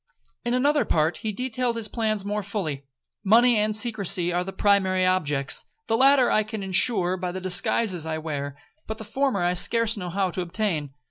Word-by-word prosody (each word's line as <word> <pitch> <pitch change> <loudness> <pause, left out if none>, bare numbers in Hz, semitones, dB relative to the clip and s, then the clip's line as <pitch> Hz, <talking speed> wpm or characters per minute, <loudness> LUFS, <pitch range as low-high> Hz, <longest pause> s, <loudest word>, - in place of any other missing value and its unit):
'In 240 +1 0
another 290 +3 +2
part 155 +1 0
he 220 - -4
detailed 250 +1 -2
his 225 -2 -2
plans 215 -3 -2
more 205 +1 -2
fully. 165 -9 -5 0.4
'Money 230 +3 +5
and 215 0 +1
secrecy 200 -6 0
are 175 +1 0
the 195 - -6
primary 190 -1 +2
objects,—the 185 - -1
latter 265 0 +4
I 215 - +3
can 215 -1 -6
insure 185 -1 +1
by 180 -1 -4
the 185 - -5
disguises 185 -1 +1
I 160 0 -2
wear, 145 -3 -5 0.3
but 220 - -5
the 220 - -8
former 235 -2 -1
I 175 +1 +1
scarce 230 +4 +2
know 180 -3 -5
how 190 +1 -1
to 185 - -3
obtain. 175 -4 -2
200 Hz, 185 wpm, -24 LUFS, 180-225 Hz, 0.4 s, Money